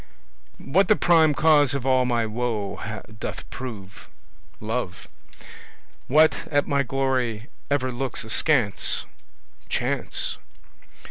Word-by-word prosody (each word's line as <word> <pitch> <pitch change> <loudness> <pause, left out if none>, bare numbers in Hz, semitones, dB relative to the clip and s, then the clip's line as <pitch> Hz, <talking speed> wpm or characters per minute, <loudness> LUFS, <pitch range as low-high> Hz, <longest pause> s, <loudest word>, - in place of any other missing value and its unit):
What 180 +7 +2
the 215 - +5
prime 160 -5 +4
cause 145 -4 +4
of 135 -2 -3
all 130 -1 +3
my 120 -2 +1
woe 110 -1 -3 0.2
doth - - -6
prove? 100 -7 -8 0.5
Love. 110 -5 -4 1.0
What 155 +1 +5
at 145 -1 +2
my 140 -1 +2
glory 130 -3 -1 0.2
ever 130 -3 0
looks 125 0 -3
askance? 115 -1 +1 0.6
Chance. - - -2
130 Hz, 105 wpm, -24 LUFS, 115-145 Hz, 1.0 s, the